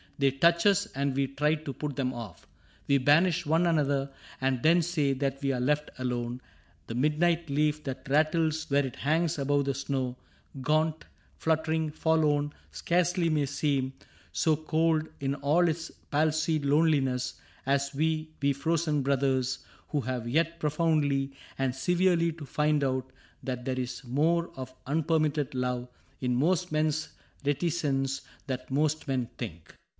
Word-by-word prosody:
They 140 Hz, -1 st, +3 dB
touch 170 Hz, +6 st, +3 dB
us, 200 Hz, 0 st, +4 dB
and 140 Hz, -1 st, -1 dB
we 135 Hz, 0 st, +1 dB
try 150 Hz, +3 st, +1 dB
to 150 Hz, -3 st, -6 dB
put 145 Hz, +2 st, -4 dB
them 130 Hz, -2 st, 0 dB
off. 120 Hz, -3 st, -9 dB, 0.4 s
We 140 Hz, -1 st, +4 dB
banish 165 Hz, +5 st, +4 dB
one 160 Hz, +3 st, +3 dB
another 140 Hz, -4 st, +1 dB, 0.3 s
and 130 Hz, -2 st, 0 dB
then 170 Hz, +4 st, +5 dB
say 155 Hz, -5 st, +1 dB
That 135 Hz, 0 st, -2 dB
we 135 Hz, -1 st, +1 dB
are 130 Hz, -, -1 dB
left 150 Hz, +4 st, +1 dB
alone: 125 Hz, -1 st, -3 dB, 0.4 s
the -, -, -6 dB
midnight 155 Hz, +5 st, +1 dB
leaf 150 Hz, +1 st, +1 dB
That 135 Hz, 0 st, -6 dB
rattles 155 Hz, +2 st, +2 dB
where 140 Hz, 0 st, +3 dB
it 130 Hz, -, -6 dB
hangs 160 Hz, +3 st, +1 dB
above 140 Hz, 0 st, +1 dB
the 140 Hz, -, 0 dB
snow 130 Hz, -2 st, -2 dB, 0.2 s
— 130 Hz, -, -13 dB
Gaunt, 155 Hz, +3 st, +1 dB, 0.3 s
fluttering, 160 Hz, -1 st, 0 dB
forlorn 150 Hz, -2 st, +1 dB
— -, -, -31 dB
scarcely 175 Hz, 0 st, +1 dB
may 150 Hz, -2 st, +2 dB
seem 135 Hz, -2 st, 0 dB, 0.4 s
So 155 Hz, -, +2 dB
cold 160 Hz, 0 st, +1 dB
in 140 Hz, 0 st, -1 dB
all 150 Hz, +6 st, +3 dB
its 165 Hz, 0 st, -2 dB, 0.2 s
palsied 155 Hz, 0 st, +1 dB
loneliness 140 Hz, -4 st, +2 dB, 0.3 s
As 140 Hz, 0 st, +1 dB
we, 155 Hz, +2 st, 0 dB
we 140 Hz, 0 st, +3 dB
frozen 155 Hz, +1 st, 0 dB
brothers, 130 Hz, -1 st, +1 dB, 0.3 s
who 145 Hz, -, 0 dB
have 125 Hz, -1 st, -3 dB
yet 165 Hz, +6 st, +1 dB
Profoundly 150 Hz, -3 st, +1 dB, 0.3 s
and 135 Hz, -1 st, 0 dB
severely 175 Hz, +3 st, +2 dB
to 155 Hz, -2 st, -9 dB
find 150 Hz, +1 st, +1 dB
out 130 Hz, -1 st, -1 dB, 0.3 s
That 125 Hz, -2 st, -4 dB
there 130 Hz, -1 st, -1 dB
is 125 Hz, 0 st, -4 dB
more 160 Hz, +7 st, +1 dB
of 130 Hz, -1 st, -7 dB
unpermitted 155 Hz, -1 st, +1 dB
love 125 Hz, -1 st, -1 dB, 0.3 s
In 125 Hz, -1 st, 0 dB
most 175 Hz, +6 st, +1 dB
men's 155 Hz, 0 st, 0 dB, 0.3 s
reticence 140 Hz, -3 st, 0 dB, 0.3 s
than 130 Hz, -2 st, -1 dB
most 150 Hz, +3 st, 0 dB
men 130 Hz, -3 st, 0 dB
think. 85 Hz, -9 st, -7 dB
145 Hz, 155 wpm, -29 LUFS, 135-160 Hz, 0.4 s, then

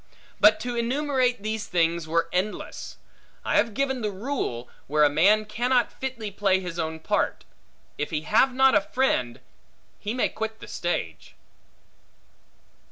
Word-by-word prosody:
But 215 Hz, +1 st, +6 dB
to 245 Hz, -1 st, -3 dB
enumerate 250 Hz, -1 st, 0 dB
these 215 Hz, 0 st, -3 dB
things 170 Hz, -1 st, +1 dB
were 165 Hz, +1 st, +1 dB
endless; 190 Hz, +4 st, -3 dB, 0.5 s
I -, -, +2 dB
have 230 Hz, -3 st, +1 dB
given 265 Hz, -1 st, 0 dB
the 210 Hz, -, -1 dB
rule, 195 Hz, -, -4 dB, 0.2 s
where 150 Hz, +2 st, +3 dB
a 145 Hz, -, +6 dB
man 200 Hz, +8 st, +4 dB
cannot 245 Hz, +3 st, +1 dB
fitly 245 Hz, -6 st, -5 dB
play 195 Hz, -1 st, +2 dB
his 180 Hz, -2 st, -6 dB
own 160 Hz, 0 st, -3 dB
part; -, -, -1 dB, 0.5 s
if 150 Hz, -, -1 dB
he 155 Hz, -2 st, -2 dB
have 225 Hz, -, +3 dB
not 265 Hz, +1 st, +4 dB
a 205 Hz, -, +5 dB
friend, 195 Hz, -, 0 dB, 0.6 s
he 210 Hz, +3 st, -4 dB
may 250 Hz, -, +1 dB
quit 220 Hz, 0 st, -5 dB
the -, -, -10 dB
stage. 80 Hz, -, -4 dB
210 Hz, 150 wpm, -25 LUFS, 165-245 Hz, 0.6 s, But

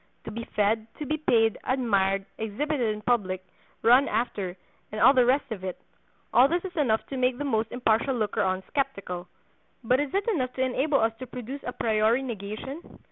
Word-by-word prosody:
To -, -, -5 dB
be 230 Hz, +2 st, -5 dB
fed, 215 Hz, +1 st, +2 dB
to 300 Hz, -, -5 dB
be 310 Hz, +3 st, -1 dB
paid, 225 Hz, -7 st, +2 dB
admired, 195 Hz, -7 st, +1 dB
exhibited 260 Hz, +7 st, -2 dB
in 210 Hz, -, -10 dB
public, 190 Hz, -6 st, 0 dB, 0.4 s
run 250 Hz, +5 st, +6 dB
after, 205 Hz, -5 st, -2 dB, 0.3 s
and 215 Hz, -, -4 dB
all 270 Hz, -, +7 dB
the 250 Hz, -3 st, +4 dB
rest 265 Hz, +1 st, +2 dB
of 200 Hz, -4 st, -5 dB
it—all 220 Hz, +6 st, -1 dB
this 345 Hz, +5 st, -1 dB
is 370 Hz, -1 st, -7 dB
enough 240 Hz, -9 st, +1 dB
to 270 Hz, -, -4 dB
make 250 Hz, -1 st, +1 dB
the 290 Hz, -, -3 dB
most 225 Hz, -5 st, 0 dB
impartial 240 Hz, +2 st, +1 dB
looker 215 Hz, -2 st, 0 dB
on 185 Hz, -1 st, 0 dB
skeptical. 200 Hz, -10 st, -3 dB, 0.6 s
But 250 Hz, +3 st, +3 dB
is 290 Hz, -2 st, -1 dB
it 395 Hz, +2 st, 0 dB
enough 255 Hz, -, 0 dB
to 260 Hz, -, 0 dB
enable 275 Hz, +3 st, +1 dB
us 225 Hz, 0 st, +2 dB
to 255 Hz, -, -7 dB
produce 250 Hz, +4 st, -7 dB
an -, -, -5 dB
a -, -, -5 dB
priori 220 Hz, +3 st, +2 dB
negation? 235 Hz, -, -7 dB
240 Hz, 190 wpm, -27 LUFS, 215-270 Hz, 0.6 s, all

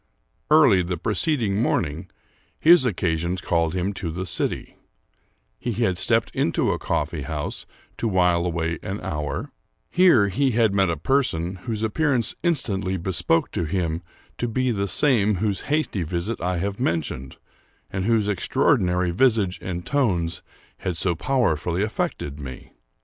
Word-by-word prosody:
Early 145 Hz, -11 st, +6 dB
the 90 Hz, 0 st, -3 dB
preceding 110 Hz, -, 0 dB
morning, 85 Hz, -4 st, -1 dB, 0.5 s
his 165 Hz, -3 st, +6 dB
occasions 90 Hz, -4 st, -1 dB
called 85 Hz, -1 st, 0 dB
him 95 Hz, +2 st, -1 dB
to 95 Hz, -3 st, -4 dB
the 90 Hz, +3 st, -4 dB
city: 85 Hz, -1 st, -2 dB, 0.8 s
he 120 Hz, -, -2 dB
had 100 Hz, -5 st, 0 dB
stepped -, -, +1 dB
into -, -, +1 dB
a -, -, -2 dB
coffee -, -, -2 dB
house 75 Hz, -2 st, -4 dB, 0.3 s
to 115 Hz, -, -1 dB
while 90 Hz, -4 st, +2 dB
away 85 Hz, -1 st, -2 dB
an 100 Hz, 0 st, -4 dB
hour; 75 Hz, -5 st, -4 dB, 0.4 s
here 170 Hz, -, +5 dB
he 130 Hz, +5 st, +1 dB
had 110 Hz, -3 st, +3 dB
met 95 Hz, -2 st, +3 dB
a 85 Hz, -, -1 dB
person 95 Hz, -, 0 dB
whose 110 Hz, -2 st, -2 dB
appearance 125 Hz, +1 st, +1 dB
in 175 Hz, -1 st, +2 dB
stantly 95 Hz, -7 st, -2 dB
bespoke 85 Hz, -2 st, +1 dB
him 85 Hz, 0 st, -1 dB, 0.4 s
to 120 Hz, -, 0 dB
be 130 Hz, +2 st, 0 dB
the 100 Hz, -3 st, -1 dB
same 110 Hz, -4 st, +3 dB
whose 100 Hz, +1 st, -1 dB
hasty 150 Hz, -10 st, 0 dB
visit 85 Hz, +7 st, -3 dB
I 90 Hz, +1 st, -1 dB
have 100 Hz, +4 st, -3 dB
mentioned, 75 Hz, -, -2 dB, 0.5 s
and 95 Hz, -1 st, -2 dB
whose 110 Hz, -2 st, +2 dB
extraordinary 90 Hz, -2 st, +1 dB
visage 105 Hz, -2 st, +2 dB
and 90 Hz, -1 st, -5 dB
tones 95 Hz, -13 st, 0 dB, 0.4 s
had 90 Hz, -3 st, -3 dB
so 85 Hz, +1 st, +1 dB
powerfully 90 Hz, -, 0 dB
affected 75 Hz, -8 st, -3 dB
me. 65 Hz, -3 st, -9 dB
95 Hz, 145 wpm, -23 LUFS, 85-115 Hz, 0.8 s, Early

